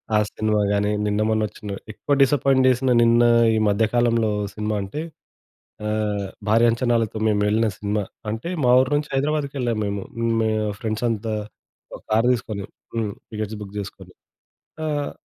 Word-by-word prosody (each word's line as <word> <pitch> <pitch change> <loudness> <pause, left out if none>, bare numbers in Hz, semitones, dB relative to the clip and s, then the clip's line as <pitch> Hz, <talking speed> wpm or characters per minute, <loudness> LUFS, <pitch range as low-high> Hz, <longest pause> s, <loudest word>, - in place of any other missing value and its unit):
ఆ - - +6
సినిమా 110 -1 0
గాని 105 0 +1 0.2
నిన్నమొన్న 110 +1 +1
ఒచ్చిన 100 -1 -7 0.2
ఎక్కువ 145 +6 -2
డిసప్పాయింట్ 135 -1 +4
చేసిన 130 +1 +2
నిన్న 115 +1 +5 0.3
ఈ - - +2
మధ్య 105 +2 +3
కాలంలో 115 -2 +2 0.2
సినిమా 105 0 -2
అంటే 100 +11 -5 0.9
ఆహ్, 105 -2 -1 0.2
భారీ 115 +2 +4
అంచనాలతో 115 -2 0
మేము 105 -1 +2
వెళ్ళిన 110 +2 +2
సినిమా. 105 0 -1 0.3
అంటే 115 +10 -4 0.2
మా 125 - +4
ఊరు 130 +1 +1
నుంచి 150 0 0
హైదరాబాద్‌కేళ్ళాము 140 -5 -1
మేము. 100 -1 -3 0.4
మే 110 - +2 0.3
ఫ్రెండ్స్ 110 +1 -3
అంతా 110 0 -2 0.6
ఒక - - -9
కార్ 115 +2 +3
తీసుకొని. 110 -5 -3 0.3
హ్మ్. 110 -3 -1 0.2
టికెట్స్ 110 0 -4
బుగ్ 100 0 -10
జేసుకొని. 100 - -8 0.7
ఆహ్, 145 -1 -2
110 Hz, 145 wpm, -23 LUFS, 105-120 Hz, 0.9 s, ఆ